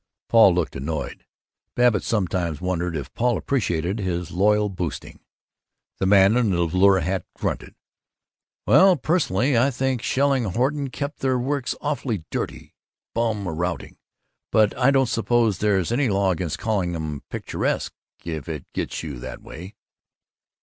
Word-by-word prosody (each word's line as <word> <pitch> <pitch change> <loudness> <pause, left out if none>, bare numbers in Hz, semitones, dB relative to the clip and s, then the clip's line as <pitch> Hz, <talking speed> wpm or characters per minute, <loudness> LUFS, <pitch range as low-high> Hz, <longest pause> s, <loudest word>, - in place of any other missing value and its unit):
Paul 110 -6 +6
looked 90 -3 -1
annoyed. 70 +3 -5 0.5
(Babbitt 120 -5 +3
sometimes 90 -7 -1
wondered 90 -2 -2
if 70 -2 -7
Paul 120 -1 +1
appreciated 95 - -1
his 90 -3 -3
loyal 105 +3 +3
boosting.) 90 -5 -5 0.8
The 95 - +1
man 100 +2 +6
in 120 -3 +2
the 85 -2 +1
velour 95 +3 +4
hat 95 +3 -1
grunted, - - -4 0.9
"Well, 185 - +6
personally, 135 - +1
I 120 +4 +4
think 130 -2 -1
Shelling 135 -2 +1
Horton 135 - -1
keep 140 +3 -5
their 130 -1 0
works 135 +1 -2
awful 140 -6 -2
dirty. - - -5 0.4
Bum 110 -4 -1
routing. 85 -1 -4 0.5
But 110 -1 +3
I 125 +1 +3
don't 135 -1 +4
suppose 115 -3 +1
there's 100 -2 +1
any 130 +1 +1
law 100 -1 +2
against 85 -2 -3
calling 95 -6 -1
'em 75 -3 -4
'picturesque' - - -2 0.3
if 80 -3 -5
it 75 -4 -5
gets - - -3
you 70 -6 -6
that - - -8
way!" 90 +6 -10
100 Hz, 145 wpm, -23 LUFS, 90-125 Hz, 0.9 s, Paul